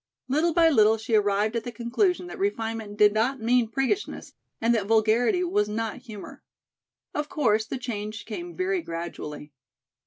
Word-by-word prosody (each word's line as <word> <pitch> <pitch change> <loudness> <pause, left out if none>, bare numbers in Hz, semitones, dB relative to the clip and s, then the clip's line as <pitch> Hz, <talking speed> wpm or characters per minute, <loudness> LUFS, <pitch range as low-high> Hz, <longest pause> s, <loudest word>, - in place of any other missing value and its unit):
Little 305 +6 +2
by 330 0 +5
little 220 -4 +5
she 225 +2 -5
arrived 210 +1 +2
at 230 - -1
the 245 - -5
conclusion 255 - 0
that 355 - -9
refinement 225 - -2
did 210 -1 +6
not 245 +5 +1
mean 235 +1 +2
priggishness 270 - -2 0.3
and 230 +1 +2
that 210 -4 0
vulgarity 225 - +3
was 210 -12 +1
not 225 0 -3
humor. 225 -6 -10 0.7
Of 295 0 -3
course 220 -6 +1
the 265 - -3
change 215 -3 -5
came 345 +10 -6
very 370 0 0
gradually. 165 - -6
225 Hz, 160 wpm, -26 LUFS, 215-275 Hz, 0.7 s, did